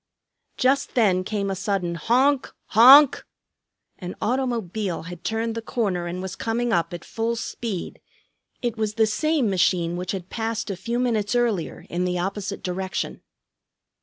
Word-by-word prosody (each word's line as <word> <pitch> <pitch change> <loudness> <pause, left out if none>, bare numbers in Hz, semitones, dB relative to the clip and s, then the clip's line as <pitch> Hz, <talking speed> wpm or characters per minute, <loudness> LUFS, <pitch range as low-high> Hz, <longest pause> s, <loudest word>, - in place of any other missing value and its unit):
Just 270 +2 +1
then 195 -6 +3
came 200 0 -2
a - - -2
sudden 185 -3 -1
"Honk, 255 - +2 0.2
honk!" 265 +5 +8 0.8
An 180 0 -6
automobile 220 -8 -2
had 175 0 -9
turned 225 +1 -1
the 230 - -4
corner 200 -8 -2
and 180 +2 -4
was 190 0 -5
coming 235 +1 -1
up 170 +2 +1
at 175 -1 -7
full 230 +1 -2
speed. 225 -4 -5 0.6
It 240 -2 -1
was 215 -1 -2
the 225 - +4
same 290 +4 +1
machine 175 -3 +1
which 180 +1 -3
had 185 -2 -6
passed 225 -1 -2
a - - -3
few 230 +6 -3
minutes 230 -3 0
earlier 230 -8 -1
in 175 +1 -2
the 180 0 -1
opposite 195 +2 -3
direction. 185 +1 -3
210 Hz, 155 wpm, -24 LUFS, 180-235 Hz, 0.8 s, honk